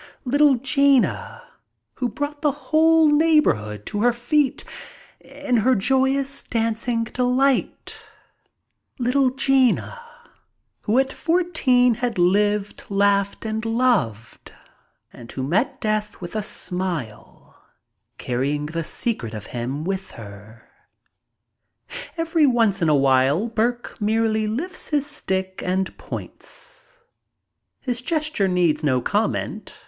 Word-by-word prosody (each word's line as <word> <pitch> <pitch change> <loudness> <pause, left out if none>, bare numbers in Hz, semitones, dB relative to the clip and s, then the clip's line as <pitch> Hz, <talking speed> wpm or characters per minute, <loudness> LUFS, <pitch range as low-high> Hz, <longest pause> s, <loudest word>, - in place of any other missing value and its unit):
Little 285 +2 +4
Gina, 275 +1 +1 0.5
who 250 -2 -2
brought 290 +4 -5
the 300 -2 +2
whole 315 +3 +3
neighborhood 290 - +2
to 205 - -3
her 245 +2 +4
feet 250 +3 0 0.6
in 275 -2 -2
her 250 +4 +3
joyous 265 +5 +1
dancing 230 0 -1
delight. 255 - 0 1.0
Little 255 +1 +2
Gina, 270 - +1 0.8
who 215 +4 0
at 270 0 +2
fourteen 320 -8 +2
had 240 -1 -3
lived, 205 +3 +1
laughed, 200 +1 +1
and 220 0 -3
loved, 225 - -1 0.6
and 120 -1 -11
who 130 - -4
met 180 - 0
death 215 -1 -2
with 175 +2 -8
a 215 - 0
smile, 180 - -6 0.5
carrying 140 +4 -2
the 165 +2 -3
secret 155 - -3
of 105 -1 -7
him 130 +5 -3
with 190 +1 -3
her. 105 +1 -12 1.5
Every 330 -2 +2
once 225 -6 +2
in 165 - +2
a 150 - +4
while 135 - +3
Burke 235 +1 -2
merely 220 0 +1
lifts 330 +13 -4
his 290 -2 0
stick 190 -10 -3
and 185 +1 -1
points. - - -9 0.8
His 245 -2 -3
gesture 305 -7 0
needs 170 -4 +1
no 130 -4 +2
comment. 210 - -2
225 Hz, 110 wpm, -22 LUFS, 185-270 Hz, 1.5 s, Little